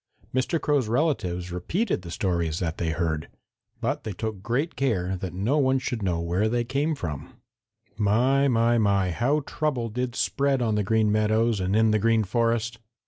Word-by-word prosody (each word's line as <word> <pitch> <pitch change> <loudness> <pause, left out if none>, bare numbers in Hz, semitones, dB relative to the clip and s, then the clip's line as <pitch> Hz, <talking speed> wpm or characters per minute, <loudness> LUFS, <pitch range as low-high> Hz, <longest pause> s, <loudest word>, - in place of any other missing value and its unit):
Mr. 130 +6 0
Crow's 145 -7 +1
relatives 100 - 0
repeated 165 - -1
the 85 - -9
stories 85 -3 -1
that 85 -3 -3
they 85 - 0
heard. 80 -2 -1 0.5
But - - -1
they 110 - -4
took 110 0 -4
great 125 - -1
care 95 -9 0
that 95 -1 -5
no 105 - 0
one 135 -1 +3
should 125 -3 -3
know 90 -4 0
where 90 +6 0
they 120 +1 0
came 140 +6 -1
from. 80 - -6 0.6
My, 125 +7 +3
my, 120 -1 +3
my, 100 -3 +2
how 135 - +1
trouble 135 -5 -2
did 125 +2 -3
spread 140 0 +1
on 115 -3 +1
the 105 - +1
Green 110 +1 +2
Meadows 110 +1 +2
and 95 +2 0
in 110 0 +4
the 110 - +2
Green 115 +1 +3
Forest! 115 +2 0
110 Hz, 180 wpm, -26 LUFS, 95-130 Hz, 0.6 s, in